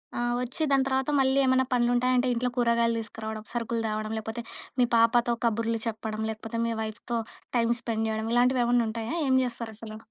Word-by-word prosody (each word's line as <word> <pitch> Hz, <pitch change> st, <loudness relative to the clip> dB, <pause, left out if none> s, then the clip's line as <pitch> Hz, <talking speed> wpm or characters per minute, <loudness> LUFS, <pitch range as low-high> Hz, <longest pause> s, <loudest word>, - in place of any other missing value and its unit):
ఆ! -, -, -2 dB, 0.2 s
వచ్చి 260 Hz, +6 st, -2 dB
దాని 270 Hz, -1 st, +4 dB
తర్వాత 265 Hz, +1 st, 0 dB
మళ్ళీ 265 Hz, 0 st, +3 dB
ఏమన్నా 260 Hz, 0 st, +3 dB
పనులుంటాయంటే 245 Hz, +1 st, +2 dB
ఇంట్లో 245 Hz, +1 st, 0 dB
కూరగాయలు 235 Hz, -1 st, +3 dB
తీసుకురావడం, 220 Hz, -1 st, -6 dB
సరుకులు 230 Hz, -1 st, -1 dB
తేవడం, 215 Hz, 0 st, -3 dB
లేకపోతే 225 Hz, +2 st, -5 dB, 0.4 s
మీ 245 Hz, -, +6 dB
పాపతో 235 Hz, +1 st, +4 dB
కబుర్లు 230 Hz, 0 st, 0 dB
చెప్పడం, 220 Hz, 0 st, -4 dB
లేకపోతే 225 Hz, +1 st, -5 dB
మీ 230 Hz, -, -1 dB
వైఫ్‌తో 220 Hz, +2 st, -4 dB, 0.4 s
టైం 230 Hz, 0 st, +2 dB
స్పెండ్ 225 Hz, -1 st, -1 dB
చేయడం 220 Hz, 0 st, -2 dB
ఇలాంటివి 250 Hz, +1 st, +4 dB
ఏమన్నా 240 Hz, 0 st, +3 dB
ఉంటాయా? 225 Hz, +6 st, -3 dB
ఏం 260 Hz, -, +4 dB
చేస్తారసలు. 225 Hz, -3 st, -6 dB
235 Hz, 165 wpm, -27 LUFS, 220-245 Hz, 0.4 s, మీ